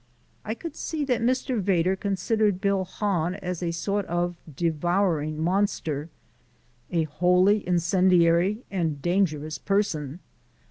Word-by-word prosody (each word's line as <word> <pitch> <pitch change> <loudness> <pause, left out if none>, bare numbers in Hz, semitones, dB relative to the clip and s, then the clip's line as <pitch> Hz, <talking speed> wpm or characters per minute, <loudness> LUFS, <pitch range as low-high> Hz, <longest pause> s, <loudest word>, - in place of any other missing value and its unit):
I 220 - -3
could 330 +6 -7
see 305 -3 -3
that 250 -3 0
Mr. 250 -1 0
Vedder 185 -1 +2
considered 200 +1 0
Bill 195 -1 +1
Hahn 185 -3 -1
as 180 -3 -5
a 175 - -1
sort 200 +5 -1
of 175 +1 -1 0.2
devouring 165 0 0
monster, 165 -4 -1 0.8
a 170 -2 +2
wholly 180 +6 +3
incendiary 180 +3 +3
and 165 -7 -1
dangerous 155 -4 0
person. 170 -7 -1
180 Hz, 120 wpm, -26 LUFS, 165-200 Hz, 0.8 s, wholly